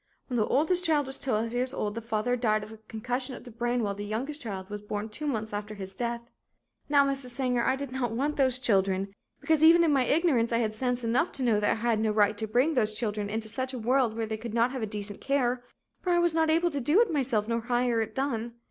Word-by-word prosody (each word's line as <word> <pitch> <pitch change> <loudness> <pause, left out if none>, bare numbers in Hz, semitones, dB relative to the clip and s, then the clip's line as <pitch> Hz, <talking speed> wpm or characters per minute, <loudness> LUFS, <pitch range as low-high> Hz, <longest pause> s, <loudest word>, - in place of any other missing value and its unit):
When 250 - -3
the 215 - +2
oldest 335 +6 +2
child 310 -4 +2
was 270 +1 -4
twelve 230 -2 -1
years 255 +2 -1
old 205 -1 -2
the 230 - -5
father 230 +2 -1
died 215 -3 +1
of 215 +1 -11
concussion 250 +4 -3
of - - -11
the 245 - -11
brain 240 +1 -1
while 200 -1 -1
the 205 +1 -6
youngest 260 +9 -3
child 195 -5 -5
was 210 0 -6
born 210 +1 -4
two 295 +8 -5
months 220 -5 -3
after 210 +1 -5
his 190 -1 -8
death. 235 +2 -2 0.7
"Now, 285 -1 +5
Mrs. 275 -2 -2
Sanger, 250 -1 0
I 260 - +2
did 275 -1 -6
not 255 -2 -1
want 280 +6 -1
those 260 -3 +2
children, 195 -4 +1 0.3
because 315 -1 +2
even 335 +2 +7
in 315 -3 +3
my 265 -2 +3
ignorance 280 -6 +2
I 230 - +2
had 220 -2 0
sense 245 +2 -1
enough 245 +9 +1
to 270 - -3
know 225 -4 +3
that 210 - +1
I - - +1
had 230 -1 0
no 220 0 +1
right 210 0 +3
to 220 - -2
bring 250 +9 +2
those 215 -5 +2
children 210 -3 -2
into 220 +1 -1
such 260 +4 -3
a - - -4
world 240 0 +1
where 225 -1 -2
they 220 0 -4
could 230 0 -6
not 235 +2 +3
have 240 -5 -4
decent 205 -1 -5
care, 255 -3 0 0.4
for 365 - -3
I 350 - +4
was 345 -1 +2
not 320 -1 +2
able 335 +2 +2
to 285 -2 -3
do 295 - +3
it 440 -8 +1
myself 245 -7 +3
nor 230 0 0
hire 240 -1 +1
it 220 - -5
done. 240 -4 -2
240 Hz, 255 wpm, -28 LUFS, 215-270 Hz, 0.7 s, even